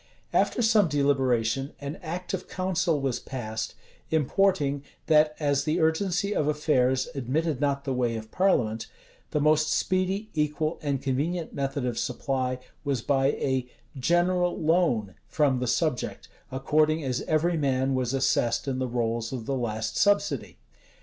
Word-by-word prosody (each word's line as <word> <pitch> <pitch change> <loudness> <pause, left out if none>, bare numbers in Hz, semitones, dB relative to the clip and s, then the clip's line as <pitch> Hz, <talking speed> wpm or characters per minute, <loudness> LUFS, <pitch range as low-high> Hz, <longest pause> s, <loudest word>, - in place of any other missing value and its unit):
After 240 - +2
some 220 -4 +4
deliberation, 135 -3 +1
an 145 +4 -5
act 175 +2 -5
of 185 -1 -3
council 180 -4 0
was 135 -3 -1
passed, 110 -4 -5 0.3
importing, 160 -2 +2 0.2
that 155 -1 +4
as 145 -2 +1
the 155 +3 0
urgency 180 +5 +1
of 150 - +1
affairs 130 -4 +2
admitted 145 +3 -1
not 140 -1 0
the 135 - -2
way 120 -2 0
of 110 0 -7
parliament, 115 - +1 0.4
the 150 - 0
most 155 +1 +3
speedy, 190 +3 0
equal, 155 +1 -1
and 140 -3 -2
convenient 155 +6 -1
method 135 -1 -2
of 120 -2 -2
supply 130 0 -1 0.3
was 135 -5 -1
by 135 -1 +2
a 130 -2 -1 0.3
"general 175 +5 +1
loan" 155 - +2
from 140 -4 +2
the 125 - -2
subject, 125 +1 -1 0.2
according 155 +4 +2
as 130 -2 -1
every 165 +2 +2
man 135 -3 +1
was 130 -2 0
assessed 130 -2 +1
in 130 -1 -1
the 130 - -1
rolls 115 -1 -1
of 125 -4 -5
the 135 - -1
last 110 -3 -2
subsidy. 205 0 +1
140 Hz, 150 wpm, -27 LUFS, 130-160 Hz, 0.4 s, some